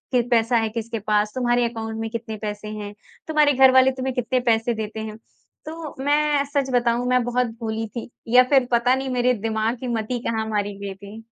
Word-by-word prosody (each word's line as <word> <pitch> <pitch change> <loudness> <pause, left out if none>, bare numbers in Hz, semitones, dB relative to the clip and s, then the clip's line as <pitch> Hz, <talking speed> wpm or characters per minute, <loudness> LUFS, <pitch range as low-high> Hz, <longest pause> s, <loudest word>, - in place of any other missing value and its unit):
क 245 - +4
पैसा 235 0 +3
है 225 -1 +1
किसके 225 0 -4
पास, 210 0 +1
तुम्हारे 245 -1 +2
अकाउंट 225 -1 -5
में 225 0 -3
कितने 225 -1 -5
पैसे 210 0 -5
हैं, 210 -1 -6 0.3
तुम्हारे 300 -2 +3
घर 265 0 +6
वाले 260 0 +5
तुम्हे 260 0 -3
कितने 250 +1 0
पैसे 225 +1 +2
देते 220 0 -5
हैं। 215 0 -6 0.5
तो 315 -1 -7
मैं 295 0 +2
सच 280 -1 -1
बताऊँ 240 0 +2
मैं 250 -1 +3
बहुत 245 +1 0
भोली 225 0 -3
थी 235 - -5 0.2
या 250 +2 +7
फिर 270 -3 +4
पता 245 +2 +3
नहीं 265 0 -3
मेरे 250 0 +2
दिमाग़ 220 +1 0
की 255 - -5
मती 235 +1 -2
कहाँ 220 -1 -1
मारी 205 -1 -2
गई 200 -1 -5
थी 205 +3 -11
235 Hz, 205 wpm, -23 LUFS, 220-255 Hz, 0.5 s, या